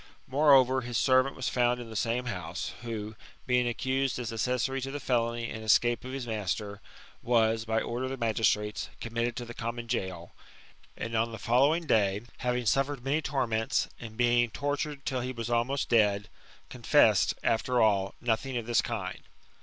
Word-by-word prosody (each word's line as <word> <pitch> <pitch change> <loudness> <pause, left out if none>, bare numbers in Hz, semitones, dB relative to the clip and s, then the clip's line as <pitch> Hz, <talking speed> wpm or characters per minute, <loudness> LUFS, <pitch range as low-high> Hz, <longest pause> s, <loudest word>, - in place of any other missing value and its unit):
Moreover, 130 -2 +5
his 120 -1 -3
servant 130 +2 +3
was 130 - -3
found 125 0 +1
in 115 -2 -8
the - - -8
same 115 +4 0
house, 90 -9 -4
who, 110 -2 -5 0.3
being 125 -1 +2
accused 130 +2 -1
as 120 -2 -4
accessary 125 +3 -1
to 135 - -4
the 145 +1 -4
felony 120 -2 0
and 110 -1 -6
escape 120 +2 +3
of 130 - -7
his 135 -2 -4
master, 105 -2 -3 0.4
was, 115 -1 +2
by 110 0 0
order 120 +2 -3
of - - -3
the 135 - -4
magistrates, 110 -2 0
com 115 - -7
mitted 120 0 -1
to 125 -1 -5
the 120 - -8
common 115 0 -4
gaol, 95 -7 -4 0.7
and 115 - -5
on 115 +1 +1
the 110 - -6
following 140 +10 +2
day, 100 -6 +2 0.2
having 125 0 -1
suffered 135 +3 +1
many 145 +4 +1
torments, 120 -6 0
and 110 -2 -9
being 120 -1 +3
tortured 145 +2 -3
till 130 -2 -1
he 125 +1 -3
was 120 -1 -5
almost 125 +4 0
«dead, 105 -3 +3 0.4
confessed, - - +3
after 120 +2 +1
all, 100 -3 +2
nothing 120 +2 -1
of 115 - -3
this 120 0 +2
kind. 95 -6 -4
120 Hz, 175 wpm, -29 LUFS, 110-130 Hz, 0.7 s, Moreover